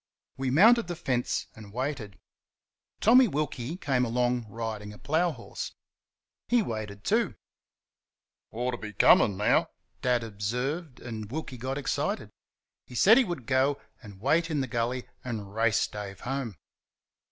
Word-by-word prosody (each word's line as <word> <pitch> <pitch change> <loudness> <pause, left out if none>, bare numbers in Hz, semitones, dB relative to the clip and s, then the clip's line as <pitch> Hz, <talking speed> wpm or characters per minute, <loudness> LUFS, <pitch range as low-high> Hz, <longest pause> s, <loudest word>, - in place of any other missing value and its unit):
We 135 -1 -2
mounted 220 - +6
the 175 - -3
fence 125 -7 -1
and 105 -2 -12
waited. 125 -5 -4 0.8
Tommy 250 +3 +7
Wilkie 150 - -3
came 135 -8 +1
along 120 0 0
riding 110 -1 -5
a - - -12
plough 160 +8 +1
horse. - - -7 0.7
He 240 -2 +3
waited 105 - -5
too. - - +1 1.1
"Ought 125 +3 -2
to 120 - -4
be 105 -2 -7
coming 95 0 +5
now," 105 - +3 0.3
Dad 125 -2 +2
observed, 125 - -3
and 110 -3 -6
Wilkie 150 -3 -5
got 130 +3 -3
excited. 145 - -2 0.6
He 125 - -11
said 220 - +7
he - - +5
would 175 - -5
go 135 +2 +2 0.2
and 100 -5 -12
wait 160 - +2
in 150 -3 0
the 130 - -2
gully 120 +1 -2 0.2
and 105 -5 -5
race 110 0 +2
Dave 100 -2 -7
home. 125 -3 -3
125 Hz, 145 wpm, -28 LUFS, 110-145 Hz, 1.1 s, Tommy